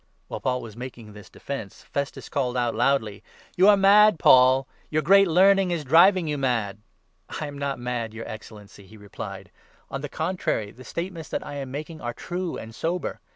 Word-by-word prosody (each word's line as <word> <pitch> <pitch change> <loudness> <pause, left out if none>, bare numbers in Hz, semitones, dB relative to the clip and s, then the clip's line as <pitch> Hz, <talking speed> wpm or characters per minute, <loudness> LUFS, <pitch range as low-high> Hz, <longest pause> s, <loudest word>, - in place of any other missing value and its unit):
While - - -5
Paul 125 -1 -1
was 110 -3 -10
making 120 -3 -9
this 105 -1 -13
defence, 115 -8 -7
Festus 140 0 -5
called 130 -4 -2
out 120 -1 +1
24 - - -8
loudly: 115 -6 0 0.3
"You 185 +2 +5
are 205 -1 +7
mad, 205 0 +6
Paul; 130 -1 +5 0.2
your 155 0 0
great 195 +5 +6
learning 190 +2 +4
is 170 -3 -2
driving 170 +5 +5
you 150 -1 -2
mad. 115 -7 -1 0.3
" - - -11
"I 155 - -3
am 145 -1 -8
not 140 -1 -2
mad, 120 -2 -4
your 115 +1 -8
Excellency," 105 -2 -11
he 110 +3 -15
replied; 100 -1 -9 0.4
"on 135 - -4
the 145 - -5
25 - - -40
contrary, 160 - -2
the 125 +4 -14
statements 170 +3 -6
that - - -4
I 145 - -7
am 135 -2 -5
making 155 +4 -7
are 120 0 -4
true 180 -1 -4
and 115 0 -9
sober. 170 +8 -3
135 Hz, 200 wpm, -25 LUFS, 115-170 Hz, 0.4 s, are